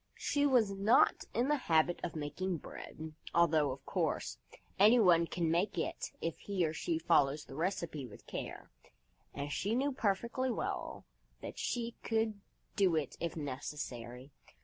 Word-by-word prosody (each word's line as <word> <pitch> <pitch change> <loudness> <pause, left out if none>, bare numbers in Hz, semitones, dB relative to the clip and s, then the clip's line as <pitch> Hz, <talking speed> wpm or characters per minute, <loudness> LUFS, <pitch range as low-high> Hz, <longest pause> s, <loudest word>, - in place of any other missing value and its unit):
She 290 0 +2
was 240 -7 +4
not 200 +6 +4
in 240 +3 +1
the 295 +1 +3
habit 160 +2 +4
of 175 - -3
making 160 +5 -2
bread, 160 +1 -8 0.2
although, 160 -4 +4
of 135 +1 -6
course, - - -1 0.4
anyone 195 -6 +6
can 165 -2 0
make 180 +4 +1
it 165 - -2
if 165 -1 -3
he 195 -4 0
or 155 - -1
she 160 +1 -1
follows 150 -3 +3
the - - -11
recipe 160 -3 -2
with 105 - -14
care, - - -6 0.6
and 145 +1 -4
she 205 +9 0
knew 275 +3 +1
perfectly 235 +2 0
well 240 - -3 0.4
that - - -7
she 235 -1 -2
could 220 -2 0 0.3
do 190 -5 +3
it 150 -4 -1
if 170 -1 -3
necessary. 130 -3 -5
170 Hz, 150 wpm, -34 LUFS, 150-215 Hz, 0.6 s, anyone